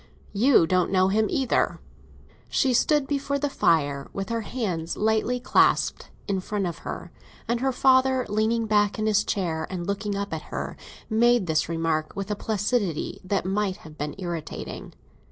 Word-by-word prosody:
You 230 -2 +5
don't 180 +2 +1
know 185 0 +3
him 215 +2 +2
either." 265 -3 +1 0.7
She 265 -3 +2
stood 295 +4 +3
before 280 0 -1
the 285 0 -1
fire, 145 - +1
with 195 +2 -4
her 230 0 -1
hands 185 -8 -3
lightly 220 +3 +1
clasped - - +2 0.2
in 195 -2 0
front 200 +1 -2
of 175 - -4
her; - - -7 0.4
and 235 0 0
her 265 +1 +1
father, 260 0 +3
leaning 220 +2 +1
back 210 -1 +2
in 215 - -1
his 215 -1 +3
chair 165 -5 -2
and 180 -2 -4
looking 200 +1 -2
up 200 -2 -3
at 160 - -3
her, - - -4 0.3
made 235 -1 +3
this 160 -1 0
remark 165 -2 -1
with 200 +1 -4
a - - 0
placidity 205 -4 -1
that 190 0 -1
might 195 0 0
have 155 -1 -11
been 150 0 -4
irritating. 175 -4 -6
205 Hz, 170 wpm, -25 LUFS, 175-235 Hz, 0.7 s, You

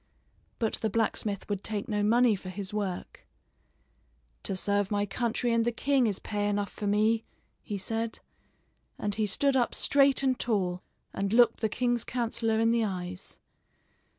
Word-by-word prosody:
But 225 -2 -1
the 220 - +1
blacksmith 210 -2 -1
would 200 -2 -3
take 210 +1 -2
no 210 -3 0
money 230 +2 +4
for 185 -1 -8
his 195 +2 -6
work. 200 -4 -4 1.1
"To 195 - -3
serve 200 0 0
my 205 -1 +1
country 235 +3 -1
and 230 0 +3
the 240 - +1
king 265 +1 +2
is 200 -3 0
pay 205 -1 -2
enough 205 0 -1
for 205 - -5
me," 215 +2 +2 0.4
he 205 - -4
said; 225 +3 -3 0.8
and 205 -1 -1
he 215 0 0
stood 275 +7 +1
up 245 -2 +1
straight 275 -1 +3
and 260 -2 +1
tall 185 -6 0 0.3
and 195 0 -2
looked 230 0 +5
the 220 - 0
king's 240 0 0
counselor 230 -2 -1
in 225 0 +3
the 235 -1 +2
eyes. 180 -2 -5
215 Hz, 165 wpm, -29 LUFS, 200-235 Hz, 1.1 s, looked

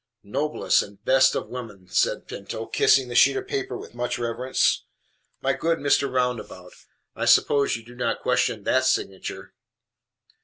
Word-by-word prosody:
"Noblest 140 +8 +1
and 100 +1 -12
best 130 0 +4
of - - -3
women!" 105 -7 -8
said - - 0
Pinto, 105 +3 -6
kissing 135 +2 +3
the 120 - -6
sheet 120 - +5
of 390 -1 -5
paper 400 -1 -3
with - - -11
much 120 0 -3
reverence. 120 +2 0 0.6
"My 135 +1 +2
good 165 +4 0
Mr. 140 -2 +1
Roundabout, 125 -8 -3 0.4
I - - -2
suppose 140 -1 +4
you 115 - -14
do 120 - -13
not 120 -2 -2
question 125 -3 +1
THAT 130 +4 +2
signature?" 95 -7 -2
125 Hz, 155 wpm, -24 LUFS, 115-135 Hz, 0.6 s, sheet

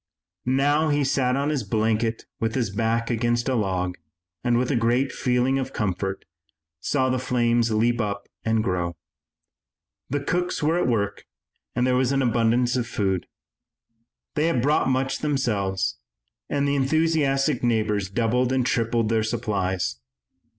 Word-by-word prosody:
Now 145 +4 +2
he 145 -1 +2
sat 130 -1 +1
on 140 +2 0
his 150 -3 0
blanket 110 +2 0
with 115 0 -1
his 120 -6 0
back 115 +3 0
against 120 0 0
a 130 - +1
log 95 -6 -1 0.4
and, 120 -1 +2
with 125 +3 0
a - - +1
great 120 +3 +2
feeling 125 +2 +1
of 135 0 -4
comfort, 95 -1 -2 0.5
saw 130 - +1
the 130 - 0
flames 120 -2 +1
leap 115 +2 +2
up 100 -1 -3 0.2
and 110 -1 +1
grow. 90 -3 -1 1.1
The 145 - 0
cooks 175 +2 -1
were 160 +3 +2
at - - +1
work, 100 -4 -1 0.5
and 125 +1 +2
there 130 0 +2
was 130 0 +2
an 135 -1 +2
abundance 120 +1 +2
of 120 -2 -1
food. 95 -6 -1 1.1
They 150 +2 +1
had 165 -7 +1
brought 145 +2 +2
much 135 +1 0
themselves, 110 -10 -1 0.5
and 140 0 0
the 140 - +1
enthusiastic 140 -1 +2
neighbors 105 -5 +1
doubled 120 +4 +1
and 130 -2 +1
tripled 115 -2 +1
their 115 -1 +2
supplies. 95 - -1
120 Hz, 150 wpm, -24 LUFS, 110-135 Hz, 1.1 s, Now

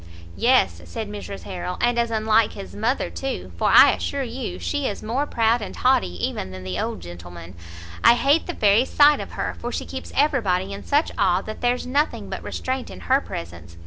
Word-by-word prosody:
"Yes," 85 -1 +3
said 205 - -5
Mrs 205 -1 -7
Harrel, 180 -1 -5
"and 240 0 +2
as 235 0 +1
unlike 220 0 +2
his 195 - -9
mother 225 +6 -1
too, 270 -1 -5
for - - +1
I - - +8
assure 280 -1 -2
you 245 0 -5
she 290 -2 -2
is 205 - -5
more 255 +7 -1
proud 230 -1 +2
and 205 - -6
haughty 90 - +1
even 95 - -5
than 95 0 -9
the 90 0 -4
old - - -3
gentleman. 85 0 -10 0.5
I 235 - +8
hate 280 +6 +2
the 350 - -3
very 210 -1 +4
sight 295 +2 +5
of - - -7
her, - - -3
for - - -4
she - - -3
keeps - - -7
every 285 -2 +3
body 190 -1 -1
in 200 - -7
such 295 +2 +1
awe 190 -1 +2
that 215 - -8
there's 245 0 0
nothing 285 +4 -1
but - - -4
restraint 260 0 -4
in - - -10
her 265 +2 +2
presence. 85 - -8
220 Hz, 210 wpm, -23 LUFS, 180-260 Hz, 0.5 s, I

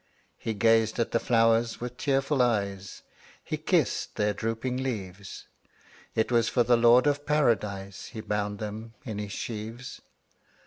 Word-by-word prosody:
'' - - -41
He 110 - -1
gazed 115 +1 +3
at 115 - 0
the 115 - +2
flowers 115 0 +2
with 125 0 -5
tearful 135 0 +1
eyes, 100 -5 -1 0.4
He - - -3
kissed - - 0
their 105 0 +1
drooping 115 +4 -2
leaves; 100 -7 -5 0.7
It 110 +2 +1
was 115 -1 +3
for 120 - +3
the 120 +1 +4
Lord 120 +2 +6
of 145 0 +1
Paradise 105 -9 0
He 110 - -8
bound 105 -1 -2
them 110 +2 -7
in 110 -4 -4
his 105 -1 -5
sheaves. 115 +3 -6
115 Hz, 150 wpm, -28 LUFS, 105-120 Hz, 0.7 s, Lord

